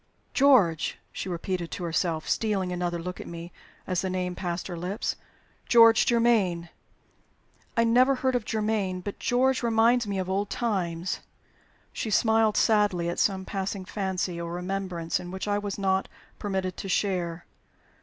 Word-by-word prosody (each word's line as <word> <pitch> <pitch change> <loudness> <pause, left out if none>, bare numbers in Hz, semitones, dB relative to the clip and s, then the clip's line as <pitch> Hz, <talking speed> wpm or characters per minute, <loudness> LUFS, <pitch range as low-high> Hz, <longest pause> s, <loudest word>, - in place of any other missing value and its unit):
"George!" 245 - +4
she - - -5
repeated 175 0 -3
to - - -5
herself, 165 -1 -1
stealing 200 -5 0
another 175 -1 -1
look 180 +2 -6
at - - -9
me 170 +1 -8 0.3
as 185 -2 0
the 190 - -2
name 180 -1 -2
passed 175 -1 -3
her 180 - -5
lips. 180 +5 -3 0.5
"'George 230 -1 +6
Germaine.' 215 -8 +2 1.1
I 230 - +5
never 250 +4 +4
heard 260 0 0
of 245 -2 0
'Germaine.' 210 -4 -1
But 200 +2 -6
'George' 255 +1 +2
reminds 235 0 +3
me 200 -1 -2
of 185 -1 -2
old 195 +2 -1
times." 185 -6 -2 0.7
She 225 - -3
smiled 220 0 +3
sadly 205 -6 +3
at 175 - -3
some 190 -2 +1
passing 195 -1 -3
fancy 185 -3 -2
or 170 0 -5
remembrance 180 -2 -2
in 175 - -8
which 190 +2 -5
I 205 0 +1
was 205 -1 -4
not 190 -1 +1 0.3
permitted 190 -3 -2
to 195 - -5
share. 175 -3 -1
190 Hz, 155 wpm, -27 LUFS, 175-220 Hz, 1.1 s, George